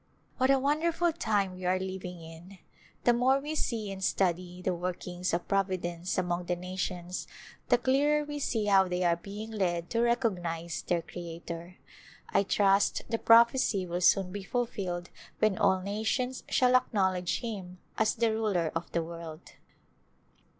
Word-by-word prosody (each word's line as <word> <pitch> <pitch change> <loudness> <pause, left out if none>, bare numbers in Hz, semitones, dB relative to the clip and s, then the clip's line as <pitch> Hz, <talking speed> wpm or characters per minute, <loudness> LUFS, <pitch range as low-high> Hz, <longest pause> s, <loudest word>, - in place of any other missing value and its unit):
What 260 +1 +3
a 275 - +6
wonderful 325 +5 +1
time 205 - 0
we 185 0 -10
are 185 +1 +2
living 185 -2 -6
in 165 +4 -12 0.2
— - - -29
the 240 - +5
more 255 +3 +3
we 295 +3 -4
see 225 -9 -2
and 190 0 -6
study 180 -1 0
the 180 0 -1
workings 180 0 -3
of 170 +1 -2
Providence 185 -3 -1
among 175 -1 -1
the 175 - 0
nations 180 0 -4 0.4
the - - +6
clearer 290 +4 +2
we 295 0 -5
see 225 -6 0
how 195 -2 +5
they 180 0 -1
are 170 -1 +3
beino; 205 +5 -8
led 175 -3 -1
to 230 - +1
reco2;nize 180 -9 0
their 170 -1 +1
Creator. 170 0 -8 0.5
I - - +3
trust 200 0 +2
the 225 0 -1
prophecy 230 -4 +5
will 175 0 -3
soon 185 0 +4
be 205 +1 -5
fulfilled 195 -7 -3 0.3
when 215 -2 +2
all 190 -3 +3
nations 220 +6 -2
shall 250 0 +4
acknowledge 190 -9 +1
Him 195 -6 -6 0.2
as 220 0 +2
the 230 -1 +2
Ruler 200 -7 0
of 165 +1 -4
the 170 - +1
world. 165 -1 -9
190 Hz, 160 wpm, -30 LUFS, 175-230 Hz, 0.5 s, a